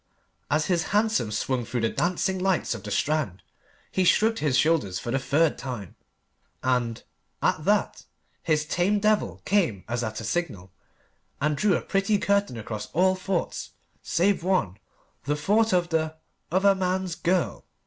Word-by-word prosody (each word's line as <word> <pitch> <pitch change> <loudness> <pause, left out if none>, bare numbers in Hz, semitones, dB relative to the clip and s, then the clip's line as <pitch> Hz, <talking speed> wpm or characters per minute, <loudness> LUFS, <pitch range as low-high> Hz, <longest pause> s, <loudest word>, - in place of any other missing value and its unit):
As 155 +1 +2
his 175 -3 +1
hansom 215 - +1
swung 125 +3 -1
through 120 +1 -3
the 115 - +2
dancing 180 +6 0
lights 185 -6 +1
of 115 - -7
the 105 - -7
Strand, 140 - -1 0.5
he 185 - +1
shrugged 220 +5 +3
his 140 -4 +1
shoulders 150 - +2
for 120 - -4
the 135 - +1
third 150 +4 +1
time. 120 -9 -6 0.7
And, 125 -3 0 0.4
at - - 0
that, - - +1 0.4
his 155 -1 +1
tame 180 +6 +1
devil 215 +1 +1
came 165 - +1
as 120 0 -2
at 110 -1 -3
a - - -6
signal, 110 - -3 0.7
and 150 +1 +1
drew 195 +4 +2
a - - -5
pretty 195 +2 +1
curtain 200 - +1
across 105 -1 -5
all 185 +3 +4
thoughts 185 -1 -3 0.3
save 190 +3 +1
one 180 - +1 0.5
the 145 - +1
thought 215 +9 +2
of 175 -1 +2
the 160 -1 0 0.4
"other 195 +3 +4
man's 185 -1 -1
girl." 180 +1 -1
165 Hz, 160 wpm, -26 LUFS, 120-190 Hz, 0.7 s, all